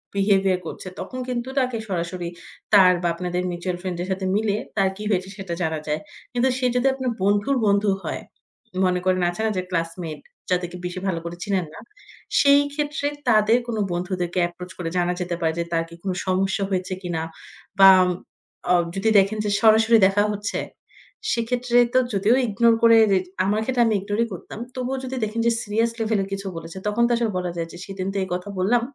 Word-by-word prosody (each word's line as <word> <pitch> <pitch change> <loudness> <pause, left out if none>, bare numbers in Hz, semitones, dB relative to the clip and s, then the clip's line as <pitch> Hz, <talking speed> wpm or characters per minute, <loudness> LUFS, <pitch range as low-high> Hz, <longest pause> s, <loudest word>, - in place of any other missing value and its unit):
Behaviour 195 -2 +3
করছে - - -7
তখন 255 - -6
কিন্তু 250 0 -3
তাকে 250 -3 0
সরাসরি 175 -1 -3 0.4
তার 185 -2 +8
বা 175 - +1
আপনাদের 180 0 -2
মিউচুয়াল 175 +1 -3
ফ্রেন্ড 185 -2 -4
এর - - -6
সাথে 190 0 -2
মিলে 210 -1 +1 0.2
তার 195 -1 +3
কী 210 - -6
হয়েছে 190 -1 0
সেটা 190 -3 -5
জানা 160 -2 -1
যায়। 150 +1 0 0.3
কিন্তু 245 +2 +2
সে 255 - -1
যদি 250 +2 +3
আপনার 260 -2 -2
বন্ধুর 205 +7 +2
বন্ধু 200 0 +3
হয়, - - -4 0.6
মনে 180 0 +1
করেন 185 -1 +2
আছে 175 +5 -5
না - - +2
যে - - +1
ক্লাসমেট 165 -2 -3 0.3
যাদেরকে 180 -1 -1
বেশি 180 +1 -4
ভালো 170 -3 0
করে 170 +1 -6
চিনেন 190 -4 0
না। - - -10 0.6
সেই 280 0 +6
ক্ষেত্রে 295 0 -2 0.2
তাদের 220 +1 +5
কোন 225 -2 -3
বন্ধুদেরকে 180 0 -2
এপ্রোচ 180 +1 -10
করে 170 -2 -3
জানা 175 0 +1
যেতে 175 -1 -2
পারে 160 -1 +1
যে - - +1
তার 165 0 +2
কি 170 - -11
কোন 190 - -1 0.2
সমস্যা 190 +2 +1
হয়েছে 185 0 -2
কিনা 170 -3 -3 0.6
বা 195 0 +10 0.8
অ - - +6 0.2
যদি 210 +3 +1
দেখেন 200 +3 +1
যে - - 0
সরাসরি 225 +1 +6
দেখা 200 +1 +2
হচ্ছে, 205 0 -3 0.7
সেক্ষেত্রে 240 +1 0 0.2
তো 255 - +6
যদিও 205 +5 +3
ইগনোর 230 +2 +3
করে 230 0 +7 0.5
আমার 210 +2 +1
ক্ষেত্রে 245 0 +2
আমি 220 -2 +2
ইগনোরই 205 +4 -1
করতাম। 185 - -9 0.2
তবুও 255 +1 -2
যদি 260 +1 -4
দেখেন 220 +2 -4
যে - - +4
সিরিয়াস 225 +2 0
লেভেলে 215 -3 +1
কিছু 195 0 -4
বলেছে 165 +3 -8
তখন 225 +3 +1
তো - - -2
আসলে 230 -2 0
বলা 180 -1 -2
যায় 165 0 -2
যে - - -9
সেদিন 195 -1 -5
তো - - -3
এই - - -5
কথা 180 +3 -4
বললাম। 230 +6 +3
195 Hz, 195 wpm, -23 LUFS, 180-225 Hz, 0.8 s, বা